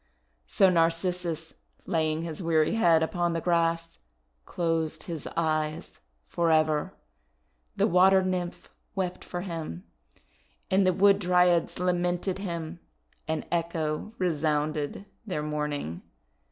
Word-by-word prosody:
So 195 - +4
Narcissus, 165 -1 0 0.3
laying 160 -1 0
his 165 +1 -5
weary 160 -1 +2
head 170 -8 +4
upon 175 +1 0
the 165 - -1
grass, 165 -1 0 0.5
closed 165 -2 -1
his 165 -5 -6
eyes 155 -1 -1 0.3
forever. 155 -3 +1 0.8
The - - +2
Water 190 +2 +5
Nymph 180 -2 -3 0.2
wept 185 -2 -2
for 175 - -5
him, 165 - -5 0.9
and 190 0 +4
the 185 - +4
Wood 200 +2 +5
Dryads 180 -2 +3
lamented 180 +1 0
him, 170 -3 -5 0.5
and 160 0 -2
Echo 165 +3 -2
resounded 155 -1 -1 0.2
their 150 -6 -2
mourning. 150 - -3
170 Hz, 110 wpm, -27 LUFS, 155-180 Hz, 0.9 s, Water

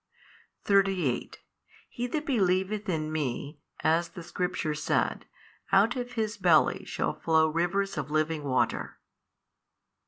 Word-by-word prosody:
38 195 -10 +1 0.5
He 245 +1 -4
that 300 +4 -3
believeth 200 -3 +1
in 155 -3 -1
Me, 145 0 -3 0.2
as 165 +2 +2
the 170 0 -9
Scripture 180 -2 -2
said, 150 - -1 0.4
out 200 +5 +4
of 245 -1 -4
his 220 -2 -2
belly 175 -5 +3
shall - - -2
flow 160 -1 +2
rivers 175 +3 0
of 145 -1 -4
living 155 0 0
water. 130 -3 -1
175 Hz, 120 wpm, -28 LUFS, 155-200 Hz, 0.5 s, out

